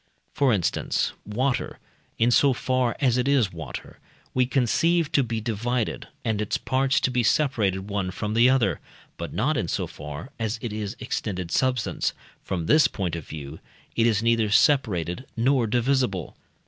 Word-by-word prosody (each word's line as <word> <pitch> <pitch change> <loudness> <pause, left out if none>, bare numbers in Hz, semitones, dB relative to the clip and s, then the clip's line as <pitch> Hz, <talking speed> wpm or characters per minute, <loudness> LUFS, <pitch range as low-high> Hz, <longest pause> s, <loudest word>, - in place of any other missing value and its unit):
For 140 -3 +3
instance, 95 -6 0
water, 125 +5 -1 0.4
in 115 +2 +3
so 135 +2 +5
far 125 -1 0
as 125 -2 +2
it 125 - 0
is 130 -9 +2
water, 80 -7 -8 0.3
we 125 -1 +2
conceive 155 +6 +2
to 140 - +4
be 115 -3 -2
divided, 115 +1 -2 0.2
and 110 -2 0
its 105 - -1
parts 135 +1 +1
to 130 - +1
be 125 -1 +2
separated 105 -7 +1
one 100 -3 -2
from 105 +3 -3
the 120 +3 +5
other; 110 - +2 0.4
but - - -5
not - - 0
in - - -1
so - - -1
far 75 - -8
as 110 0 -1
it 115 -2 -5
is 105 +1 -4
extended 95 -8 -3
substance; 130 -3 0 0.3
from 85 -4 -3
this 155 - +5
point 90 -5 -3
of 85 - -7
view 75 0 -8 0.4
it 115 0 +3
is 110 -1 +1
neither 115 -2 +2
separated 105 - +2
nor 125 0 +2
divisible. 120 - 0
115 Hz, 165 wpm, -25 LUFS, 100-130 Hz, 0.4 s, so